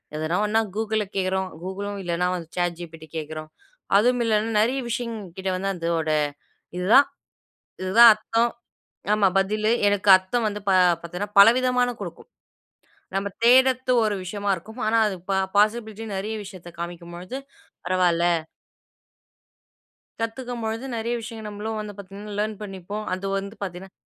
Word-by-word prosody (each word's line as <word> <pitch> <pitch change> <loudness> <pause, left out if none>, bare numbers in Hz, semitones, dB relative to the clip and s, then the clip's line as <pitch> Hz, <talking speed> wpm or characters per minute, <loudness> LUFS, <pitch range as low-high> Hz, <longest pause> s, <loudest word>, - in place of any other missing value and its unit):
எதனா 155 +3 -1
ஒண்ணா 220 +2 +2 0.2
"Google"ல 220 -1 0
கேக்குறோம், 190 0 0
"Google"லும் 200 +2 -5
இல்லனா 175 +1 0
வந்து 170 -3 -6
"ChatGPT" 170 -2 -3
கேக்கிறோம், 155 0 -6 0.5
அதுவும் 245 +3 +3
இல்லைனா 220 0 +1
நிறைய 255 +5 +1
விஷயங் 235 -1 -3 0.2
கிட்ட 190 0 -2
வந்து 195 +1 -1
அதோட 165 -2 -1 0.7
இதுதான் 220 +10 +5 0.7
இதுதான் 225 +5 +8
அர்த்தம், 225 +2 0 0.7
ஆமா 205 -2 +3
பதிலு 215 +3 +1 0.2
எனக்கு 205 0 0
அர்த்தம் 215 +5 -1
வந்து 210 0 -5
பா 190 - +4 0.3
பாத்தீங்கன்னா 180 +5 -5
பலவிதமான 250 +3 +5
குடுக்கும். - - -8 0.9
நம்ப 195 +1 0 0.2
தேடுறது 255 +1 +5
ஒரு 210 -2 +1
விஷயமா 200 +2 -2
இருக்கும், 220 +8 -10
ஆனா 225 +1 +3
அது 195 - -3 0.4
பாசிபிலிட்டி 220 +1 +1
நிறைய 215 +3 -3
விஷயத்த 180 -2 -10
காமிக்கும்பொழுது 175 +7 -6 0.5
பரவால்ல. 180 -2 +2 2.0
கத்துக்கும்பொழுது 230 0 -4
நிறைய 230 +2 -2
விஷயங்கள், 220 -1 -7
நம்மளும் 215 +1 -4
வந்து 210 -1 -7
பார்த்தீங்கன்னா 200 +1 -9
லேர்ன் 215 0 -1
பண்ணிப்போம். 200 +2 -6
அது 190 +1 -7
வந்து 200 +3 -8
பார்த்தீங்கன்னா 185 +1 -7
205 Hz, 125 wpm, -24 LUFS, 185-225 Hz, 2.0 s, இதுதான்